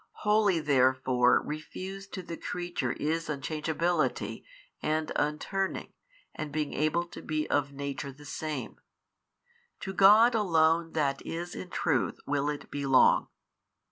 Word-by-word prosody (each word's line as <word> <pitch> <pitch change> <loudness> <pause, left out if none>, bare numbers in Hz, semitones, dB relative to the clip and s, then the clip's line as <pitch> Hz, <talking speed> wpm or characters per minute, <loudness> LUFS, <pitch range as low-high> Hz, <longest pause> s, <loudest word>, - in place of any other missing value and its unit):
Wholly 210 -4 +3
therefore 130 -3 +3
refused 190 +6 -7
to 185 - -5
the 170 -1 -6
creature 175 -8 -3
is 160 +2 -2
unchangeability 155 +1 -1 0.4
and 155 0 -1
un 150 +1 +1
turning 195 +3 -3 0.4
and 155 -1 -5
being 150 -1 -2
able 155 +4 +1
to 170 - -10
be 155 -1 -2
of 140 -1 +1
nature 140 0 -5
the 145 +2 -15
same; 150 -2 -5 1.0
to 190 - -4
God 210 +6 +7
Alone 165 -5 +2
That 140 -3 0
is 175 +1 -5
in 185 - -7
truth 140 -7 0
will 145 0 0
it 145 -1 -6
belong. 140 -2 +4
155 Hz, 130 wpm, -29 LUFS, 140-175 Hz, 1.0 s, God